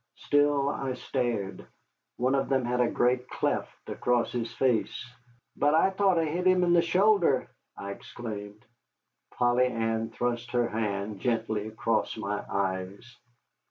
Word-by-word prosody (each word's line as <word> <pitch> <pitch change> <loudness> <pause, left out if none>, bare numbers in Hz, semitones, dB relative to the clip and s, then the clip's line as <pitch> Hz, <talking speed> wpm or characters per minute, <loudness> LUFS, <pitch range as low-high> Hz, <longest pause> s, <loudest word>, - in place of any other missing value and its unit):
Still 145 -1 +2
I 135 -2 -3
stared. 120 -7 -3 0.5
One 130 +2 +1
of 135 0 0
them 135 -2 +1
had 125 +1 +1
a 120 - +3
great 125 +1 +1
cleft - - -3
across 120 -1 0
his 120 -2 -3
face. 120 -1 0 0.5
"But 145 +2 +3
I 180 +4 +4
thought 190 -2 +2
I 165 - +2
hit 175 +4 -1
him 185 -1 +4
in 175 -1 +3
the 170 - +6
shoulder," 180 -4 +3 0.3
I 100 - -5
exclaimed. 105 -1 -8 0.6
Polly 120 +1 +2
Ann 115 -1 -1
thrust 120 0 -3
her 120 -1 +2
hand, 105 -2 -3
gently, 110 -2 -1
across 110 +1 -1
my 105 -1 -3
eyes. 95 +5 -3
120 Hz, 145 wpm, -28 LUFS, 110-140 Hz, 0.6 s, the